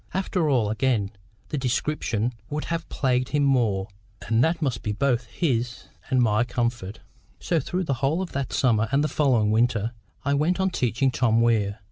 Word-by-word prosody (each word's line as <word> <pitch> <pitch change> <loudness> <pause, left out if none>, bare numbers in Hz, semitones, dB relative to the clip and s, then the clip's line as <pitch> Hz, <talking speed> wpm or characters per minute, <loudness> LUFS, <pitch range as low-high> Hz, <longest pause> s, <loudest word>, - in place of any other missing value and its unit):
After 185 -4 0
all, 115 -7 +2
again, 110 -4 0 0.4
the 150 - -2
description 125 -3 -1 0.2
would 150 +1 -3
have 165 -1 -4
plagued 130 -2 0
him 145 -1 +1
more, 115 -8 +2 0.4
and 115 +3 +3
that 165 +2 +1
must 135 -8 -1
be 105 - -2
both 120 0 0
his 120 -2 -2 0.2
and 130 -2 +2
my 110 -1 +3
comfort. 120 -4 -3 0.4
So 170 - 0
through 180 +6 -2
the 140 - -1
whole 145 +5 +1
of 180 - -8
that 140 -1 -3
summer 115 -4 +2
and 140 +1 +3
the - - +2
following 125 -9 +2
winter, 115 -1 +1 0.3
I 140 - +2
went 155 +6 +1
on 190 0 +1
teaching 125 -2 +1
Tom 115 -2 +2
Weir. 110 -3 +2
125 Hz, 180 wpm, -25 LUFS, 115-145 Hz, 0.4 s, and